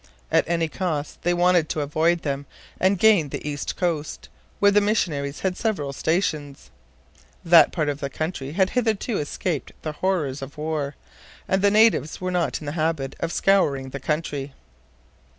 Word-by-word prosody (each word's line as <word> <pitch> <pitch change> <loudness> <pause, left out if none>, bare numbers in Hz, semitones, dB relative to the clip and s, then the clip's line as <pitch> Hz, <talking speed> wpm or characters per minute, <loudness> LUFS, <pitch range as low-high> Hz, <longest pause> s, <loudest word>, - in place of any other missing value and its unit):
At - - +2
any 165 -1 +1
cost 155 -3 -3
they 175 - +1
wanted 175 -2 +3
to 155 - -1
avoid 160 +4 +1
them 140 -1 -3 0.3
and 190 +1 +3
gain 195 -7 +4
the 145 - -5
east 145 -1 -3
coast, 165 -4 -3 0.3
where 200 0 +5
the 205 +1 +4
missionaries 155 -10 -1
had 190 -1 0
several 180 -12 -2
stations. 155 -3 -2 0.7
That 165 -2 +7
part 155 -4 -1
of 145 -1 -2
the 140 - -3
country 150 -1 -4
had 190 +1 +2
hitherto 225 -2 0
escaped 150 +1 -3
the 155 - -2
horrors 150 -5 -1
of 135 +3 -8
war, 150 -2 -3 0.5
and 190 0 +1
the 200 - +5
natives 215 -7 +3
were 185 0 -2
not 175 -3 -1
in - - -8
the 145 - -3
habit 155 -4 -1
of 165 - -2
scouring 145 -11 +2
the 140 - -5
country. 145 -1 -3
160 Hz, 170 wpm, -24 LUFS, 145-185 Hz, 0.7 s, That